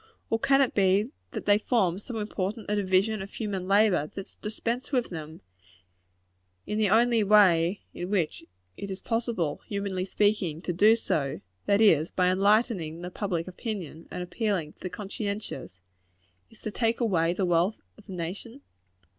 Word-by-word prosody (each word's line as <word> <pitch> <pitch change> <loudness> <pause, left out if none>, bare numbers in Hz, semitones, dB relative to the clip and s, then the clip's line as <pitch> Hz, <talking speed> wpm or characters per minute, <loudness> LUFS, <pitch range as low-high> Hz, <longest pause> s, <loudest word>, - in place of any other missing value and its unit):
Or 225 - +2
can 275 +3 +4
it 265 - +2
be 200 +4 +3 0.2
that - - -6
they 205 0 +5
form 195 -6 +1
so 225 +3 -7
important 210 0 -3
a - - +2
division 200 +2 +2
of 195 - -7
human 195 -5 -4
labor, 195 -6 +4
that 195 - -5
to - - -25
dispense 230 +4 -3
with 250 -6 0
them 160 -1 -7 1.2
in 210 - -2
the 210 -2 +3
only 230 +1 +4
way 195 -3 +5
in 175 - -5
which 180 -6 -1 0.3
it 200 - -6
is 190 0 -5
possible, 225 -10 -2
humanly 200 -2 -2
speaking, 195 -6 +1
to 175 - -2
do 210 +6 +6
so 145 -11 -2 0.3
that 200 +1 +4
is, 165 -7 +5
by 180 -1 +2
enlightening 190 -4 +1
public 180 -4 -2
opinion, 185 - -6
and 180 - -4
appealing 180 -5 -2
to - - -37
the 185 - -5
conscientious 200 - -5 0.7
is - - -19
to 215 - -3
take 230 +2 0
away 175 -8 +2
the 185 +2 0
wealth 175 +4 +1
of 215 - -19
the 190 - -7
nation? 195 +10 -6
200 Hz, 165 wpm, -27 LUFS, 180-220 Hz, 1.2 s, do